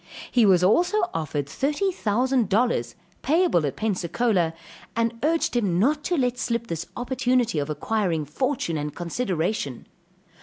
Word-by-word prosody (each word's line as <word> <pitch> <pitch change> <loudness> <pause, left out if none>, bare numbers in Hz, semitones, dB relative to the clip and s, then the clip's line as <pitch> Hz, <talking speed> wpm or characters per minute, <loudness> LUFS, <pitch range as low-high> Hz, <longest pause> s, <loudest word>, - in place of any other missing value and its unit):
He 235 -4 +4
was 180 -2 +5
also 350 - +3
offered 150 -3 -2
thirty 295 - 0
thousand 245 - +1
dollars, 200 - +1 0.3
payable 290 - +2
at 135 - -4
Pensacola, 185 -3 0 0.4
and 230 0 0
urged 320 0 +1
him 200 -8 +1
not 295 +10 +2
to 355 - 0
let 250 -2 0
slip 235 -2 -1
this 170 -5 -5
opportunity 245 - +1
of 145 +1 -3
acquiring 165 0 -1
fortune 170 - -1
and 150 0 -4
consideration. 175 - -2
220 Hz, 140 wpm, -24 LUFS, 165-255 Hz, 0.4 s, was